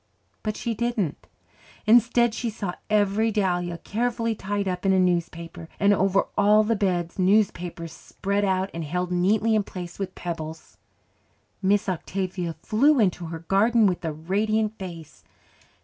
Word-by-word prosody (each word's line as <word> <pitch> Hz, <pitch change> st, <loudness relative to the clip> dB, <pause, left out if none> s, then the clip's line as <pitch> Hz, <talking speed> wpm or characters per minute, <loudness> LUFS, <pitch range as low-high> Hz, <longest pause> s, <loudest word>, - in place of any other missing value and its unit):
But 215 Hz, -1 st, -3 dB
she 235 Hz, -, -2 dB
didn't. 225 Hz, -, -2 dB, 0.6 s
Instead 235 Hz, +1 st, +4 dB
she 235 Hz, +1 st, -2 dB
saw 205 Hz, -4 st, -4 dB, 0.2 s
every 210 Hz, +1 st, +2 dB
dahlia 175 Hz, -4 st, 0 dB
carefully 230 Hz, +4 st, -1 dB
tied 205 Hz, -1 st, -3 dB
up 180 Hz, -1 st, -2 dB
in 195 Hz, -, +3 dB
a -, -, +3 dB
newspaper, 170 Hz, -2 st, -1 dB
and 200 Hz, 0 st, +5 dB
over 195 Hz, 0 st, +2 dB
all 210 Hz, +1 st, +5 dB
the 225 Hz, +1 st, +1 dB
beds 180 Hz, -4 st, -1 dB
newspapers 180 Hz, -4 st, +1 dB
spread 200 Hz, +1 st, -3 dB
out 190 Hz, 0 st, 0 dB
and 165 Hz, -, -4 dB
held 180 Hz, +4 st, -2 dB
neatly 205 Hz, +5 st, +2 dB
in 215 Hz, -, +3 dB
place 180 Hz, -3 st, -8 dB
with 195 Hz, -, -4 dB
pebbles. 160 Hz, -2 st, -6 dB, 0.8 s
Miss 205 Hz, +1 st, +2 dB
Octavia 185 Hz, -1 st, -3 dB
flew 275 Hz, +6 st, +3 dB
into 180 Hz, -5 st, +1 dB
her 165 Hz, 0 st, -7 dB
garden 220 Hz, +3 st, +4 dB
with 180 Hz, -3 st, 0 dB
a 160 Hz, -, -1 dB
radiant 210 Hz, +7 st, 0 dB
face. 170 Hz, -5 st, -9 dB
195 Hz, 150 wpm, -25 LUFS, 175-215 Hz, 0.8 s, and